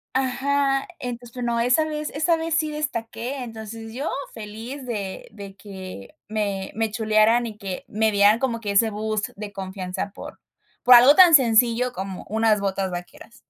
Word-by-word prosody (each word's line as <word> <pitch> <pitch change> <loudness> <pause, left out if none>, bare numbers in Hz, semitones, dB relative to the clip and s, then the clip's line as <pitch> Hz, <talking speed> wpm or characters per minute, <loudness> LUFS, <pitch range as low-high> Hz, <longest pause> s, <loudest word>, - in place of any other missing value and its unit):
Ajá. 270 +1 +1
Entonces 245 -1 -6
tú 250 - -7
no 235 -1 0
esa 250 +6 +3
vez 305 -1 -4
esa 320 +3 +1
vez 325 0 -2
sí 310 -1 +1
destaqué, 255 -3 -4
entonces 225 -1 -8
yo 275 +5 -3 0.2
feliz 225 +5 -8
de 205 -6 -5
de 200 -2 -10
que 190 - -10
me 200 -3 -3
me 225 0 -1
chulearan 220 +2 +3
y 220 -2 -7
que 195 -4 -6
me 220 +1 +1
dieran 205 +2 +5
como 235 -3 -1
que 205 -3 -3
ese 220 +3 +4
boost 215 0 -3
de 210 -1 -7
confianza 190 0 -5
por - - -10 0.4
por 250 - +9
algo 255 +5 +8
tan 360 -3 +8
sencillo 245 -1 +4
como 190 -2 -6
unas 220 0 +2
botas 195 -1 -2
vaqueras. 175 +6 -9
225 Hz, 170 wpm, -23 LUFS, 205-255 Hz, 0.4 s, por